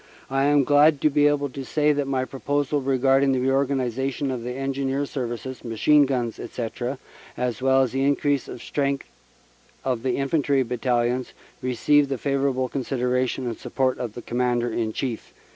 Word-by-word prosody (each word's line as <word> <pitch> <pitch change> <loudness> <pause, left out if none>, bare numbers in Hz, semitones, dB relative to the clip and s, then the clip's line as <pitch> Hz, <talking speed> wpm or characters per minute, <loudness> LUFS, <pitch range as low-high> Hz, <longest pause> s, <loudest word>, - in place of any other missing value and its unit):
I 135 +1 +2
am 145 -1 +4
glad 145 +2 +5
to 155 - +3
be 145 0 +4
able 145 -1 +1
to 135 +1 -7
say 150 +2 +2
that 145 -1 -1
my 130 -1 0
proposals 145 +1 -1
regarding 135 +1 +3
the 130 - +1
reorganization 135 0 0
of 120 -2 -4
Engineer 135 +2 -2
Services, 130 -1 -5
Machine 140 +6 +3
Guns, 120 -4 -2
etc., 120 +3 -4 0.4
as 125 -2 -2
well 135 0 +4
as 125 - -2
the 135 +1 0
increase 145 0 +1
of 120 - -8
strength 140 -1 -1 0.8
of 125 -3 0
the 130 -1 0
Infantry 140 -1 +1
Battalions, 125 0 -1 0.3
received 140 +3 +2
the 135 - -1
favorable 135 -1 0
consideration 125 0 -1
and 115 -2 -4
support 130 -1 -1
of 120 -4 -4
the 120 - -7
Commander 120 -1 0
in 110 -1 -1
Chief." 120 -1 -4
135 Hz, 160 wpm, -24 LUFS, 125-140 Hz, 0.8 s, glad